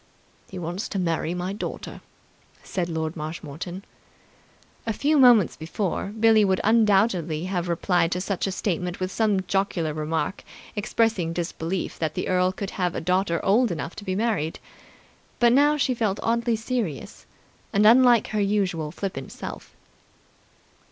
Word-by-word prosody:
"He 190 - -8
wants 175 +3 -4
to - - -4
marry 170 -1 -1
my 180 +2 -3
daughter," 210 - -6 0.6
said 175 -2 -3
Lord 160 -1 -3
Marshmoreton. 165 +3 -6 1.0
A 225 - +1
few 295 +6 +2
moments 240 -8 +6
before, 175 +4 -3
Billie 220 +1 +4
would 190 -2 +2
undoubtedly 195 -7 +3
have 180 -1 -2
replied 170 0 +1
to 180 - -2
such 195 0 -2
a - - -1
statement 180 -2 -2
with 185 0 -2
some 210 -3 +1
jocular 180 -4 0
remark 155 +5 -2 0.3
expressing 205 -5 0
disbelief 170 +1 -3
that 155 -2 -2
the - - -2
earl 185 0 +2
could 195 +1 -5
have 180 -3 -1
a - - -1
daughter 180 0 0
old 225 +5 +4
enough 170 -1 -4
to - - -7
be 185 -2 -2
married. 205 -7 -1 0.8
But 240 0 +4
now 290 +3 +4
she 260 -2 +1
felt 215 -4 -1
oddly 235 0 +1
serious 225 - -4 0.4
and 205 +1 +3
unlike 240 0 +6
her 215 -1 0
usual 195 -6 0
flippant 175 -7 -5
self. - - -8
190 Hz, 150 wpm, -25 LUFS, 170-215 Hz, 1.0 s, moments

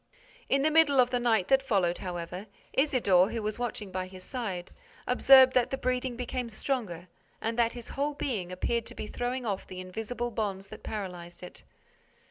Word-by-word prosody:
In 275 0 +3
the 310 - +3
middle 305 -4 +5
of 250 0 +5
the 245 - +1
night 225 -6 +2
that 270 0 +5
followed, 190 -9 +1
however, 180 +2 -5 0.3
Isidore, 220 -10 +4
who 225 -2 -3
was 215 +2 -3
watching 220 -5 -4
by 185 0 -3
his 185 0 -11
side, 195 -7 -4 0.3
observed 260 +1 +7
that 250 -2 +3
the 270 - -2
breathing 255 -1 -1
became 250 0 -3
stronger 215 -7 -3 0.3
and 225 +1 -2
that 230 -1 +3
his 240 -2 -9
whole 290 +1 -2
being 210 -12 -3
appeared 230 +5 -1
to - - -8
be - - -5
throwing 245 +3 -3
off 200 -3 -3
the 185 -1 -8
invisible 225 +6 -4
bonds 200 -3 -3
that 215 - -10
paralyzed 180 -4 -6
it. 180 - -10
225 Hz, 185 wpm, -29 LUFS, 185-255 Hz, 0.3 s, observed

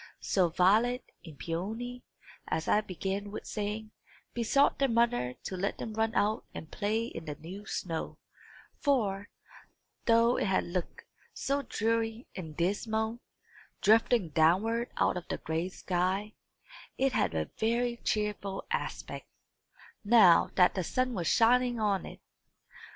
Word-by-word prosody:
So, 185 -3 +2
Violet 215 +9 +3 0.2
and 160 -5 -11
Peony, 220 - -4 0.5
as 160 - -2
I 210 - +4
began 195 +1 -4
with 205 - -7
saying, 210 +1 -4 0.4
besought 240 +4 +2
their 275 -1 +3
mother 230 - +1
to 190 - -4
let 195 +2 -2
them 220 - -5
run 220 +1 0
out 215 +3 +1
and 160 - -8
play 220 +3 -1
in 165 -8 -7
the 150 -2 -5
new 190 +7 -10
snow; 165 -4 -4 0.6
for, 205 -8 0 0.8
though 230 +1 +4
it - - 0
had 190 - +2
looked 180 - -4 0.3
so 280 +1 0
dreary 225 -1 -1
and 160 -5 -7
dismal, 220 +5 -1 0.6
drifting 220 -2 +4
downward 195 +10 +2
out - - +2
of 175 - -7
the - - -2
gray 165 +3 -2
sky, 190 +3 -1 0.6
it 270 -1 +1
had 85 -3 +1
a 80 -1 -2
very 235 +2 +1
cheerful 210 -3 -2
aspect, - - -4 0.8
now 205 -6 +6
that 180 -1 +5
the 185 - -2
sun 255 +8 0
was 175 -6 -2
shining 245 +1 +4
on 205 -3 0
it. - - -10
210 Hz, 140 wpm, -30 LUFS, 180-230 Hz, 0.8 s, now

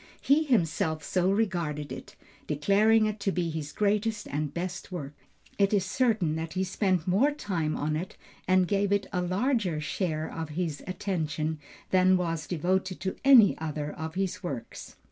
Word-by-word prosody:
He 285 +3 +3
himself 165 - +1
so 185 0 +1
regarded 170 - -1
it, 130 - -8 0.3
declaring 205 +9 +3
it 215 0 -2
to 200 -1 0
be 175 -3 -1
his 155 -2 -5
greatest 210 +1 0
and 150 0 -2
best 180 +4 -5
work. 150 -6 -5 0.5
It 200 +1 +4
is 190 -2 +1
certain 210 -7 +1
that 160 0 -4
he 185 +1 0
spent 185 -2 0
more 215 +11 +3
time 175 - -2
on 155 +1 -1
it, 175 +4 -5 0.3
and 185 -1 +4
gave 200 0 +1
it 200 -1 +2
a 180 - +1
larger 185 - 0
share 155 0 -2
of 160 -1 -5
his 165 -5 -2
attention 160 -4 -2 0.3
than 185 0 +5
was 165 -3 -2
devoted 185 +2 -1
to 190 0 -2
any 255 -7 +7
other 150 -2 -3
of 160 +1 -6
his 190 -1 -2
works. 135 -10 -6
180 Hz, 165 wpm, -28 LUFS, 155-200 Hz, 0.5 s, any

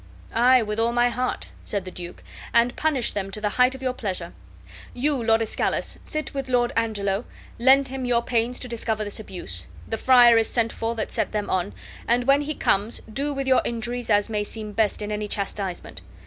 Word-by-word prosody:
"Aye, 250 +1 +5
with 210 0 -3
all 230 +1 +2
my 240 0 +3
heart," 250 +1 -3
said 200 -3 -2
the 185 - -7
duke, 175 -1 -9 0.3
"and 235 +1 +4
punish 290 -7 +1
them 195 -1 -3
to 195 - -5
the 210 0 0
height 250 +4 +3
of 265 - -10
your 255 -1 0
pleasure. 185 -8 -5 0.6
You, 275 +1 0
Lord 225 0 +3
Escalus, 220 - -1
sit 310 0 -3
with 270 -2 -4
Lord 245 -1 +2
Angelo, 210 -2 0 0.4
lend 265 +2 +5
him 265 -1 -4
your 240 -1 +2
pains 240 +1 0
to - - -5
discover 220 -2 -2
this 205 0 -3
abuse; 175 - -6 0.2
the 225 - -3
friar 245 -3 +7
is 225 -1 +2
sent 230 -2 0
for 230 +1 -2
that 220 - -3
set - - -1
them 210 -1 -2
on, 180 - -1 0.3
and 240 +1 +3
when 275 +3 +4
he 300 +1 -3
comes 205 +4 +1
do 275 +6 -2
with 275 -1 -3
your 260 -1 +4
injuries 240 +1 -3
as 205 -1 +4
may 210 -2 -1
seem 215 0 -4
best 210 0 0
in 210 - -4
any 210 0 -2
chastisement. 195 -3 -4
230 Hz, 205 wpm, -24 LUFS, 210-250 Hz, 0.6 s, friar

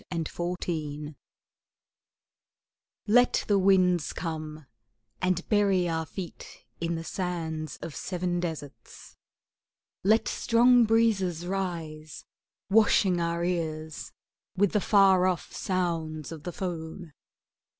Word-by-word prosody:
PRAYERS 165 -3 -2
FOR 175 +1 -3
WIND 150 -3 -4 1.9
Let 245 +4 +4
the 205 -2 +3
winds 185 -4 +3
come, 155 -3 -5 0.6
And 185 -1 0
bury 200 -4 +3
our 160 -1 -2
feet 185 -4 -9
in 170 0 -1
the 165 - -4
sands 165 -4 -4
of 155 - -6
seven 180 -1 -2
deserts; 160 -5 -7 0.9
Let 215 +4 +3
strong 240 0 +4
breezes 205 -7 +2
rise, 165 -5 -4 0.4
Washing 195 -3 +4
our 170 0 -1
ears 160 -3 -3 0.5
with 205 0 +3
the 210 - +1
far 190 -3 +5
off 180 -2 -2
sounds 165 -5 -2
of 160 -2 -9
the 175 - -3
foam. 165 -2 -6
175 Hz, 110 wpm, -28 LUFS, 160-195 Hz, 1.9 s, far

